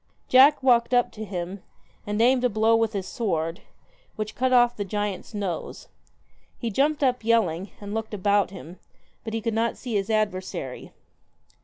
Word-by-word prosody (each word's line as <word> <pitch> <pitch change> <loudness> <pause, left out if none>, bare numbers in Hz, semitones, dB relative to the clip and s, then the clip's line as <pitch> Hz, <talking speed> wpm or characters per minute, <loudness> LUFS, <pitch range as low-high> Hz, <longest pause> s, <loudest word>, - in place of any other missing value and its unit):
Jack 270 +2 +6
walked 245 -1 +4
up 245 - +2
to 215 - -7
him, 185 -1 -5 0.5
and 210 +1 -2
aimed 250 +1 +3
a 250 - +3
blow 220 +1 +3
with 225 -1 +1
his 195 -2 -3
sword, 165 -7 -2 0.5
which 215 0 -4
cut 255 +1 0
off 240 -1 +4
the 205 - -3
giant's 205 +1 -4
nose. 195 -5 -5 0.7
He 235 -2 -3
jumped 290 +6 +1
up, 250 -3 +1
yelling, 200 -5 +1
and 205 0 -7
looked 220 -1 -3
about 200 0 +2
him, 180 -2 -11 0.4
but 225 - -6
could 230 -1 -1
not 230 +1 0
see 245 -3 -6
his 200 0 -1
adversary. 190 - -2
215 Hz, 165 wpm, -25 LUFS, 195-240 Hz, 0.7 s, Jack